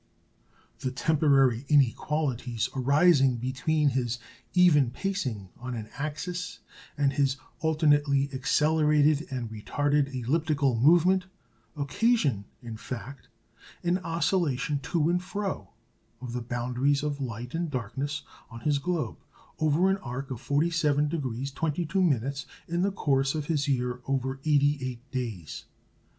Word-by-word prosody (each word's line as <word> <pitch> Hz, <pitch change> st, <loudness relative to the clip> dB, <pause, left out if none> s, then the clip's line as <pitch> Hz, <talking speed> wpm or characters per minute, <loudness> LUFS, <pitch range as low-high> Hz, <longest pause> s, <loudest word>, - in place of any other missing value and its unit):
The 130 Hz, -, -2 dB
temporary 135 Hz, -3 st, +3 dB
inequalities 130 Hz, -3 st, +1 dB
arising 140 Hz, 0 st, +4 dB
between 145 Hz, +5 st, +1 dB
his 120 Hz, -2 st, -1 dB, 0.4 s
"even 160 Hz, -8 st, +5 dB
pacing" 130 Hz, -, -3 dB
on 125 Hz, 0 st, -5 dB
an 110 Hz, -2 st, -6 dB
axis 175 Hz, +5 st, -4 dB, 0.4 s
and 140 Hz, -1 st, +2 dB
his 135 Hz, -1 st, +1 dB, 0.2 s
alternately 145 Hz, -3 st, +3 dB
accelerated 150 Hz, +2 st, +3 dB
and 120 Hz, -4 st, -4 dB
retarded 145 Hz, +6 st, 0 dB
elliptical 140 Hz, +1 st, +1 dB
movement 175 Hz, +9 st, +4 dB, 0.5 s
occasion, 145 Hz, -, +1 dB, 0.2 s
in 115 Hz, -2 st, -7 dB
fact, 130 Hz, +3 st, -8 dB, 0.6 s
an 175 Hz, +1 st, +1 dB
oscillation 165 Hz, -5 st, 0 dB
to 160 Hz, -3 st, +2 dB
and 175 Hz, +1 st, +1 dB
fro 195 Hz, +2 st, -4 dB, 0.5 s
of 125 Hz, -2 st, -7 dB
the 125 Hz, -, -2 dB
boundaries 125 Hz, +4 st, 0 dB
of 145 Hz, -1 st, -2 dB
light 120 Hz, -1 st, -5 dB
and 165 Hz, 0 st, -1 dB
darkness 140 Hz, +3 st, -3 dB, 0.3 s
on 115 Hz, -1 st, -10 dB
his 145 Hz, +1 st, +1 dB
globe 170 Hz, +1 st, -2 dB, 0.4 s
over 155 Hz, +4 st, +3 dB
an 195 Hz, 0 st, +2 dB
arc 135 Hz, -2 st, -6 dB
of 120 Hz, -, -5 dB
47° 145 Hz, -4 st, 0 dB
22', 155 Hz, -, 0 dB, 0.4 s
in 170 Hz, +1 st, -1 dB
the 200 Hz, +2 st, +2 dB
course 135 Hz, -6 st, +1 dB
of 155 Hz, -2 st, -2 dB
his 145 Hz, -2 st, 0 dB
year 125 Hz, -2 st, -1 dB
of 135 Hz, -1 st, 0 dB, 0.2 s
88 140 Hz, -4 st, +1 dB
days. 115 Hz, -, -5 dB
140 Hz, 120 wpm, -28 LUFS, 125-160 Hz, 0.6 s, even